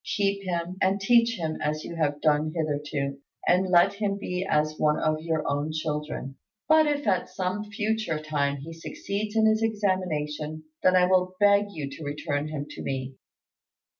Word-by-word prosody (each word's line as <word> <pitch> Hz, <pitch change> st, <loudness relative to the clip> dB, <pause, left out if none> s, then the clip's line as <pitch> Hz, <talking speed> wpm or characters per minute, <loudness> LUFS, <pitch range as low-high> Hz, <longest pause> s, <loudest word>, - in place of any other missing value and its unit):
Keep 200 Hz, 0 st, +1 dB
him, 175 Hz, 0 st, -2 dB
and 190 Hz, +1 st, +2 dB
teach 230 Hz, +2 st, +4 dB
him 160 Hz, -1 st, -3 dB
as 155 Hz, +1 st, -1 dB
you 170 Hz, -, -6 dB
have 150 Hz, -3 st, 0 dB
done 155 Hz, 0 st, +2 dB
hitherto, 145 Hz, -3 st, -2 dB, 0.3 s
and 185 Hz, +1 st, +3 dB
let 175 Hz, +1 st, +5 dB
him 200 Hz, -1 st, -1 dB
be 180 Hz, -2 st, -3 dB
as 155 Hz, -4 st, +1 dB
one 150 Hz, 0 st, +3 dB
of 155 Hz, 0 st, 0 dB
your 160 Hz, -1 st, -1 dB
own 145 Hz, +2 st, -1 dB
children; 150 Hz, -3 st, -4 dB, 0.3 s
but 315 Hz, 0 st, +6 dB
if 290 Hz, -2 st, 0 dB
at 190 Hz, -4 st, +1 dB
some 185 Hz, +2 st, -2 dB
future 215 Hz, -4 st, -1 dB
time 145 Hz, -2 st, -1 dB
he 155 Hz, +4 st, -8 dB
succeeds 200 Hz, +6 st, -4 dB
in 220 Hz, -1 st, +4 dB
his 220 Hz, 0 st, +3 dB
examination, 160 Hz, -8 st, -1 dB, 0.2 s
then 185 Hz, 0 st, +4 dB
I 180 Hz, 0 st, +6 dB
will 185 Hz, 0 st, +2 dB
beg 205 Hz, 0 st, +5 dB
you 155 Hz, -8 st, -5 dB
to 140 Hz, +3 st, -9 dB
return 145 Hz, 0 st, -2 dB
him 150 Hz, -2 st, -4 dB
to -, -, -8 dB
me." 135 Hz, -1 st, -3 dB
165 Hz, 175 wpm, -27 LUFS, 150-200 Hz, 0.3 s, but